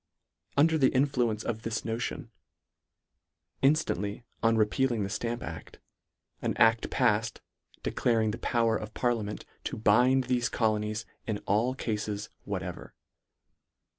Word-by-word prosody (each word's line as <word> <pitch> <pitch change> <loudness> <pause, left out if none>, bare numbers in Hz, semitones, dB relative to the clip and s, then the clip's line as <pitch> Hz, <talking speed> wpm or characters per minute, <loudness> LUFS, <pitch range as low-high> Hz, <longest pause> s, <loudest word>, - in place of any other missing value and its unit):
Under 160 +2 +4
the 130 - +5
influence 125 -5 +1
of 110 -1 -3
this 115 -1 -3
notion, 115 0 -3 1.3
inftant 140 - +3
ly 105 +3 -4 0.2
on 115 -1 +3
repealing 110 +1 +2
the 100 - -3
Stamp 120 0 -2
act, - - -8 0.6
an - - -1
adl 115 0 +4
palfed, 110 -3 +1 0.4
declaring 110 -2 +1
the 110 - -6
power 115 -2 +2
of 110 0 -5
parliament 115 -4 -1 0.2
to - - -3
bind 125 +5 +4
thefe 125 -1 0
colonies 110 0 0 0.2
in 110 -2 0
all 115 +6 +2
cafes 105 -4 -3 0.2
whatever. - - -5
115 Hz, 125 wpm, -29 LUFS, 105-125 Hz, 1.3 s, the